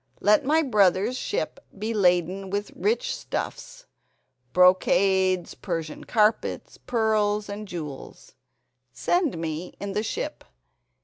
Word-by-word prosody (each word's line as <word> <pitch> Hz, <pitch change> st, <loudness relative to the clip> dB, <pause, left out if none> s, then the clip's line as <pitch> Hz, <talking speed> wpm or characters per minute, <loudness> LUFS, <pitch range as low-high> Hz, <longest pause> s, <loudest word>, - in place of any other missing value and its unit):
Let 210 Hz, 0 st, +4 dB
my 315 Hz, +4 st, +3 dB
brother's 210 Hz, -, +3 dB
ship 415 Hz, -, -3 dB, 0.2 s
be 215 Hz, +3 st, -2 dB
laden 185 Hz, -1 st, +1 dB
with 205 Hz, +1 st, -3 dB
rich 475 Hz, +3 st, 0 dB
stuffs, -, -, -6 dB, 0.7 s
brocades, 185 Hz, 0 st, +3 dB
Persian 165 Hz, -5 st, -5 dB
carpets, 215 Hz, -1 st, 0 dB
pearls 215 Hz, -3 st, +1 dB
and 205 Hz, +1 st, -6 dB
jewels. 155 Hz, -7 st, -8 dB, 0.6 s
Send 340 Hz, -, 0 dB
me 165 Hz, +1 st, -5 dB
in 200 Hz, 0 st, -4 dB
the 210 Hz, -, 0 dB
ship. 220 Hz, -, -4 dB
205 Hz, 110 wpm, -25 LUFS, 180-225 Hz, 0.7 s, Let